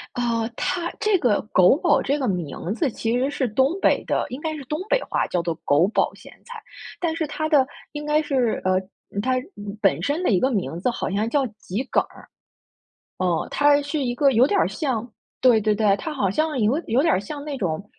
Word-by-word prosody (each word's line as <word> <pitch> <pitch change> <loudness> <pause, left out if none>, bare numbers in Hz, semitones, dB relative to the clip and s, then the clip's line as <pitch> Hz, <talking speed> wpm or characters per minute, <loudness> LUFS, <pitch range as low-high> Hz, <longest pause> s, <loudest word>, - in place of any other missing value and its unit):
呃， 230 -2 0
它 345 -1 -2
这 425 -3 +3
个 240 -9 +2
“狗 185 +6 +6
宝” 350 - +3
这 285 +2 0
个 260 - -1
名 180 +1 -3
字 290 0 0
其 230 +2 -1
实 270 +3 0
是 260 - -1
东 265 - +1
北 - - +3
的， - - 0
应 255 +3 -6
该 315 -1 -3
是 285 - -7
东 300 +5 -3
北 - - +2
话， - - -1
叫 175 - -1
做 170 -1 -2
“狗 150 +6 +4
宝 215 - 0
咸 - - -14
菜”， 475 -2 -9 0.4
但 330 -2 -1
是 325 - -1
它 310 +1 -3
的 280 -4 +5 0.3
应 295 0 -5
该 300 +1 +2
是 260 -6 0
呃， 185 0 +2 0.4
它 255 +3 +1 0.5
本 175 -6 +2
身 295 - 0
的 - - +1
一 190 - +3
个 260 +6 +1
名 180 -5 -2
字 250 - 0
好 - - -3
像 205 +3 0
叫 280 -1 +1
桔 210 +4 -4
梗 - - +3
儿。 - - -17 0.9
哦， 180 -3 0
它 290 0 +4
是 290 0 -2
一 245 -1 -1
个 275 +2 +4
有 245 +3 +5
点 400 - +1
儿 - - +3
像 245 -7 -2 0.4
对 240 -4 +6
对 210 0 +2
对， 210 -2 +3
它 315 - -5
好 200 -9 0
像 310 +4 0
有 230 +6 +2
有 245 +5 +2
点 330 - +3
儿 185 - +2
像 285 +8 -7
那 290 -2 -5
种， 185 +1 -3
255 Hz, 240 characters per minute, -23 LUFS, 205-295 Hz, 0.9 s, 狗